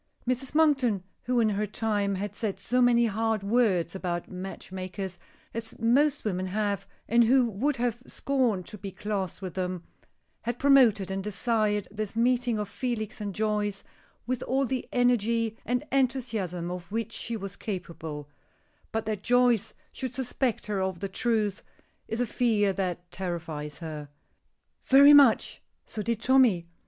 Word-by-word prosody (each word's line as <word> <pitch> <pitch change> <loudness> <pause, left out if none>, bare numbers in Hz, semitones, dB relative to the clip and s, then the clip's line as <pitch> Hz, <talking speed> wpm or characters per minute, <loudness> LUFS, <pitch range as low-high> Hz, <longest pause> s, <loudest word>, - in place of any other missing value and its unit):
Mrs. 255 +3 -2
Monkton, 265 - +3 0.2
who, 250 -1 +2
in 225 -2 +4
her 210 +1 -1
time, 205 -2 -1
had 200 +1 -4
said 205 -2 -3
so 240 +6 0
many 240 -1 +5
hard 220 -1 0
words 200 -6 +2
about 175 -3 -3
match 185 +1 -7
makers, 185 0 -5 0.3
as 225 0 -5
most 270 +5 +2
women 185 -2 -1
have, 200 0 -1 0.2
and 235 +2 +5
who 255 +2 +5
would 235 +8 0
have 240 0 -1
scorned 245 -10 0
to 210 - -9
be 200 - -5
classed 195 -1 -4
with 185 -3 -5
them, 180 -1 -3 0.6
had 240 +1 -3
promoted 240 -9 +5
and 195 0 -2
desired 210 0 0
this 215 0 -4
meeting 240 0 +2
of 210 -1 -2
Felix 220 -2 -3
and 200 -3 -4
Joyce 210 -2 -1 0.4
with 250 +1 -2
all 270 +2 +1
the 255 0 -3
energy 230 -2 +2
and 245 +1 0
enthusiasm 230 -10 0
of 180 +1 -7
which 225 0 -2
she 230 -1 -3
was 195 -1 -7
capable 165 -7 -6 0.6
But 225 0 -2
that 215 -2 -2
Joyce 245 -2 +3 0.2
should 255 -2 -5
suspect 260 -1 -1
her 205 -3 -1
of 190 -2 -2
the 195 - -3
truth 215 -1 0 0.5
is 225 - -3
a 245 - +2
fear 215 -4 +2
that 180 -2 -3
terrifies 165 -5 -5
her. 155 -3 -7 0.7
"Very 280 +2 +8
much. 280 -6 +5 0.2
So 215 - -5
did 230 +1 -2
Tommy. 245 -10 +4
215 Hz, 155 wpm, -28 LUFS, 190-245 Hz, 0.7 s, Very